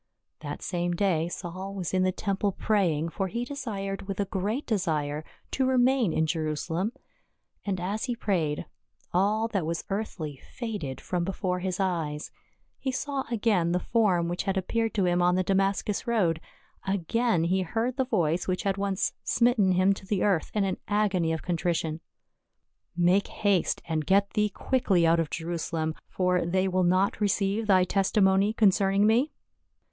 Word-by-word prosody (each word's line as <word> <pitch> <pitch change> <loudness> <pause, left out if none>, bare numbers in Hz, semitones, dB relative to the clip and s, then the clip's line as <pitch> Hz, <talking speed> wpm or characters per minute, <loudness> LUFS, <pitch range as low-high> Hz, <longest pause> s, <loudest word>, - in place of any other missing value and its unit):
That - - -6
same 175 -1 -1
day 170 -4 +1
Saul 185 +3 -6
was 185 -3 -4
in 185 - +2
the 185 0 +3
temple 200 0 -1
praying, 170 -8 +1
for 195 +3 -2
he 235 +6 -3
desired 200 -8 -5
with 195 -1 -4
a 200 - +1
great 205 +9 -2
desire 155 -8 -1 0.3
to 265 -1 +1
remain 255 -5 +3
in 160 - +1
Jerusalem. 160 +5 -1 0.8
And 190 -2 -1
as 200 +5 -2
he 245 -2 -2
prayed, 165 -10 -1 0.5
all 210 +5 +2
that 195 -6 -1
was 165 +1 -2
earthly 180 -8 -3 0.2
faded 205 - -4
from 180 -1 -2
be 190 - -1
fore 180 -2 -1
his 185 0 -3
eyes. 165 -6 -2 0.5
He 265 - -2
saw 270 +1 -2
again 205 -7 +1
the 180 - +2
form 185 -6 +2
which 175 +1 -2
had 195 0 0
appeared 225 +4 -1
to 195 -3 +2
him 175 0 +2
on 180 0 +3
the 185 - +2
Damascus 195 +3 0
road, 180 -9 +1 0.4
again 195 +1 +1
he 185 +3 +1
heard 225 +7 -1
the 265 - +3
voice 175 -8 0
which 185 +1 -1
had 195 -1 0
once 200 0 0
smitten 235 -6 +3
him 185 +2 +4
to 195 -1 -11
the 200 -2 0
earth 195 -6 +1
in 210 - +2
an 190 -1 -1
agony 200 -5 +1
of 160 - -3
contrition 170 -2 -1 0.4
— - - -54
" - - -54
Make 180 +3 +3
haste, 200 -4 0
and 160 -2 -1
get 200 +1 +3
thee 210 0 +1
quickly 200 -6 +1
out 165 +1 +4
of 165 -2 0
Jerusa 170 0 -4
lem; 160 -1 -1
for 180 -1 +1
they 185 +3 +1
will 185 0 +1
not 185 +4 +2
receive 205 +1 +1
thy 190 -3 +5
testimony 195 +1 +3
concern 195 -3 +3
ing 200 +1 +4
me 240 +8 +3
190 Hz, 175 wpm, -27 LUFS, 175-210 Hz, 0.8 s, thy